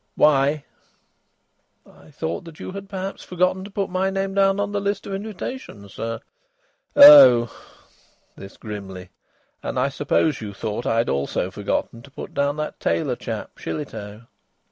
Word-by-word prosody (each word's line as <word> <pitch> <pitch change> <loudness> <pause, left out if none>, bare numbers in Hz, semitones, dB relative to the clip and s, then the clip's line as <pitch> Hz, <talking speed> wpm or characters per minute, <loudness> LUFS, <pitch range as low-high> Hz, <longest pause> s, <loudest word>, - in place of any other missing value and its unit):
"Why?" 145 0 +3 1.2
"I - - -19
thought 150 - -6
you'd 195 +1 -7
perhaps 195 -1 -5
forgotten 185 +1 0
to - - -9
put 195 -2 -3
my 185 +1 0
name 195 0 -2
down 195 0 +3
on 205 0 -1
the 205 0 -2
list 200 0 -2
of 195 - -6
invitations, 195 - -7
sir." 115 0 -5 0.7
"Oh!" 285 - +9 0.8
This 95 - -12
grimly. 95 -4 -8 0.5
"And - - -4
I 130 +2 +2
suppose 145 +1 0
you 100 -2 -7
thought 110 +3 -4
I'd 115 +1 +1
also 70 +6 -1
forgotten 105 +3 -3
to 140 - -15
put 135 - -9
down 140 +1 0
that 150 0 -4
tailor 85 0 0
chap, - - -7
Shillitoe?" 110 - -6
145 Hz, 145 wpm, -22 LUFS, -, 1.2 s, Oh